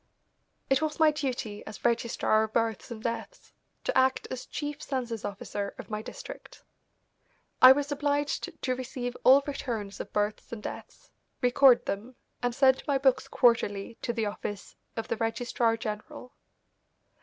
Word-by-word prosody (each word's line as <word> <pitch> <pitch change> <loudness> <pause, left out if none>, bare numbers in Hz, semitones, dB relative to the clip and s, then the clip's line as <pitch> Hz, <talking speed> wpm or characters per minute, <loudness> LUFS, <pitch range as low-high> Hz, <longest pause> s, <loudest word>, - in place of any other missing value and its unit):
It 270 +1 +3
was 310 0 -2
my 315 -1 +6
duty 255 -8 -3
as 210 - -9
registrar 235 -2 +2
of 220 0 -2
births 225 -3 0
and 225 -2 -8
deaths 235 - -5 0.3
to - - -1
act 260 0 +3
as 255 -1 -5
chief 295 0 -5
census 240 -5 -3
officer 200 0 -4
of - - -10
my 215 0 -2
district; - - -10 1.0
I 255 - +12
was 290 +1 -2
obliged 290 0 0
to 255 -1 +1
receive 245 -1 -5
all 270 +2 +7
returns 230 -8 -4
of - - -6
births 210 0 -1
and 230 -3 -6
deaths, - - -9 0.3
record 250 0 +5
them, 220 +6 -4 0.3
and 245 -1 -1
send 265 -1 +4
my 280 -2 +3
books 265 -1 +2
quarterly 225 -3 +2
to - - -1
the 230 -2 -1
office 205 -1 -5 0.2
of 225 - -3
the - - -2
registrar 230 0 0
general. 220 +3 -6
240 Hz, 155 wpm, -29 LUFS, 220-270 Hz, 1.0 s, I